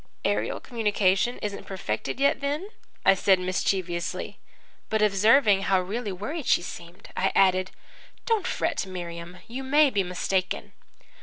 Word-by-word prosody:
"'Aerial 105 +2 0
communication 210 -1 +1
isn't 205 -1 -4
perfected 185 - -4
yet 280 0 +3
then?' 295 +8 -2 0.4
I 195 - +8
said 190 0 +4
mischievously. 180 -1 -2 0.5
But, 220 -1 +1
observing 210 +1 +4
how 195 -1 +2
really 205 +4 -3
worried 260 - -5
she - - +3
seemed, 170 0 -10
I 190 +1 +1
added, 185 -1 +4 0.6
'Don't 445 -5 +1
fret, - - -1
Miriam. 175 -1 -7
You 250 +3 -5
may 290 +1 +4
be 205 - +2
mistaken.' 185 +1 -2
195 Hz, 135 wpm, -26 LUFS, 185-240 Hz, 0.6 s, I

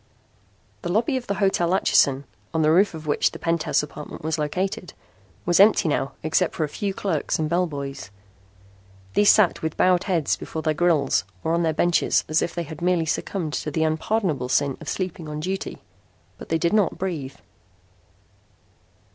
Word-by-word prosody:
The 175 - -3
lobby 230 +7 +1
of 255 -2 -3
the 200 - -1
Hotel 190 -2 +2
Atchison, 140 -7 +3 0.3
on 160 - +2
the 155 - +4
roof 180 +2 +3
of 155 -1 -9
which 145 - +2
the - - -9
penthouse 165 -2 0
apartment 150 0 -9
was 160 0 -1
located, 180 +4 -2 0.5
was 175 +1 +3
empty 200 -3 +6
now 140 -2 -1
except 165 +3 +1
for 160 - -1
a 150 - -2
few 200 +6 -3
clerks 185 -6 -1
and 155 - -1
bellboys. 145 - -2 1.0
These 205 - +5
sat 210 -5 +4
with 160 -1 -3
bowed 180 -1 +3
heads 170 -7 +1
before 160 - -6
their 155 - +1
grills 155 - +2 0.2
or 160 - 0
on 170 - +2
their 165 -1 +2
benches 175 +2 +2
as 155 +1 +2
if 170 - -3
they 170 - -2
had 160 0 -9
merely 175 -2 +2
succumbed 160 0 -2
to 155 - -2
the 160 +2 0
unpardonable 155 - 0
sin 140 0 +1
of 160 - -6
sleeping 175 -4 -4
on 150 0 -5
duty. 190 +5 -4 0.6
But - - -10
they 165 - +2
did 170 +3 0
not 210 -5 +2
breathe. 160 -8 -4
165 Hz, 180 wpm, -24 LUFS, 155-185 Hz, 1.0 s, empty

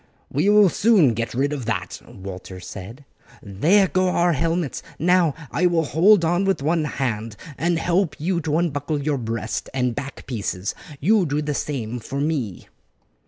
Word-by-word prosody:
"We 155 +9 +2
will 210 -2 +6
soon 190 - +4
get 115 +2 -3
rid 140 +3 +1
of 135 -5 -4
that," 95 -6 -3
Walter 95 -1 -9
said. 100 +9 -9 0.4
"There 160 - +3
go 185 +3 +1
our 175 -1 +2
helmets; 165 +1 -1 0.2
now 175 -2 +3 0.2
I 170 +7 +2
will 170 -2 +2
hold 170 +5 +4
on 175 +3 +2
with 195 -7 0
one 160 +1 +1
hand 115 -6 -3 0.2
and 170 +3 0
help 170 -2 +1
you 170 +3 0
to 155 0 0
unbuckle 150 -3 -1
your 145 -1 -1
breast 115 -1 -3
and 125 -2 +1
back 135 +4 -7
pieces; 100 -6 -3 0.3
you 195 +2 +3
do 145 +1 0
the 150 0 -2
same 125 -5 -3
for 135 +5 -5
me." 140 - -2
150 Hz, 165 wpm, -22 LUFS, 120-175 Hz, 0.4 s, will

